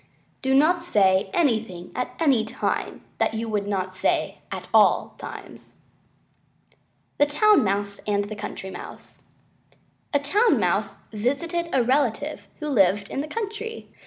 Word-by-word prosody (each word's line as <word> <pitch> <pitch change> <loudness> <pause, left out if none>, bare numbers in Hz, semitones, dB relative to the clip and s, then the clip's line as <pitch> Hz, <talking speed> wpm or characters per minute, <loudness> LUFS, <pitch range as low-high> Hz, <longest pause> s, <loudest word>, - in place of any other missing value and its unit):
Do 265 0 +2
not 330 +5 +4
say 195 - +3
anything 220 - 0
at 250 - -3
any 275 -9 +3
time 220 - -3 0.2
that - - +1
you 225 +1 -3
would 205 -2 -1
not 190 -2 -2
say 185 - 0
at - - -5
all - - +4
times. - - -10 1.4
THE 290 - +5
TOWN 420 +9 +4
MOUSE 200 0 -1
AND 205 -1 +1
THE 215 +1 -6
COUNTRY 190 -2 -6
MOUSE - - -10 0.9
A 285 - +3
Town 400 +12 +3
Mouse - - -1
once 210 -1 -6
visited 335 +7 -1
a 260 - +3
relative 275 +3 0
who 300 - -5
lived 200 -5 +3
in 270 - -2
the 300 - -5
country. 450 +3 -5
250 Hz, 145 wpm, -24 LUFS, 205-310 Hz, 1.4 s, THE